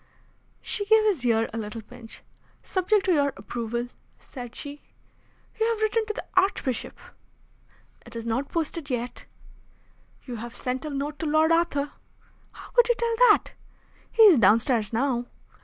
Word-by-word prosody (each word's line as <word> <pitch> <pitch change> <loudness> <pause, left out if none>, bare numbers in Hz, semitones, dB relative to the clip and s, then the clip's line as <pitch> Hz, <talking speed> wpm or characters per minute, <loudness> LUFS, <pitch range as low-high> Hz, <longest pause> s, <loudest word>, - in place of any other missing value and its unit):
She 410 - 0
gave 440 0 +5
his 395 -11 +1
ear 225 -1 +2
a 225 - -3
little 220 +1 -6
pinch. 235 0 -12 0.4
"Subject 385 +2 +1
to 370 - +3
your 285 -3 +2
approval," 235 +3 -4 0.3
said 245 -2 -10
she. 290 0 -7 0.8
"You 445 - +2
have 455 -2 -1
written 435 0 +1
to 430 - -2
the - - -6
Archbishop." 370 - 0 1.1
"It 235 -1 -14
is 230 0 -5
not 245 +5 -2
posted 325 -2 -3
yet." 245 -1 -4 1.0
"You 245 -3 -6
have 235 +2 -8
sent 255 +3 -3
a - - -3
note 285 +1 -4
to 320 - -2
Lord 310 +2 +3
Arthur." 330 -4 +1 0.6
"How - - -13
could 485 0 +4
you 480 - +4
tell 465 -1 -1
that?" 425 - +3 0.6
"He 455 - +5
is 375 - +8
downstairs 225 +1 +3
now." 245 0 0
280 Hz, 155 wpm, -26 LUFS, 235-370 Hz, 1.1 s, is